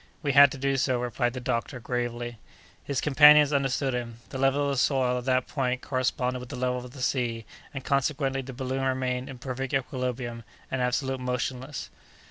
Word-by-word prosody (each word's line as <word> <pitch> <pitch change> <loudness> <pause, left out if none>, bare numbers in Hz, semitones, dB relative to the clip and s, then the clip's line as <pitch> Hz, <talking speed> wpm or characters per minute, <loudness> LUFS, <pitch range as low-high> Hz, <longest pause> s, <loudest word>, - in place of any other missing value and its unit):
"We 145 - +1
had 140 0 +8
to - - -7
do 135 0 0
so," 130 -1 +1
replied 120 0 -1
the 130 - -4
doctor, 125 +1 -2
gravely. 120 -1 -3 0.4
His 140 -2 -2
companions 150 0 +7
understood 135 -1 +1
him. 120 -2 -4
The 130 - -6
level 135 +2 +2
of 140 - 0
the 140 - -1
soil 125 -2 +2
at 125 - -9
that 130 -1 +2
point 130 -3 -1
corresponded 130 -1 -1
with 125 -1 -9
the - - -6
level 125 0 -1
of 125 - -9
the 130 0 -7
sea, 120 -4 -1 0.3
and, 135 -3 -7
consequently, 140 -1 0
the 135 +1 -8
balloon 130 +1 -3
remained 130 0 -1
in 135 - -8
perfect 130 +1 -3
equilibrium, 125 -3 -3 0.3
and 130 - -1
absolutely 130 +1 -1
motionless. 125 +2 -3
130 Hz, 190 wpm, -27 LUFS, 125-135 Hz, 0.4 s, had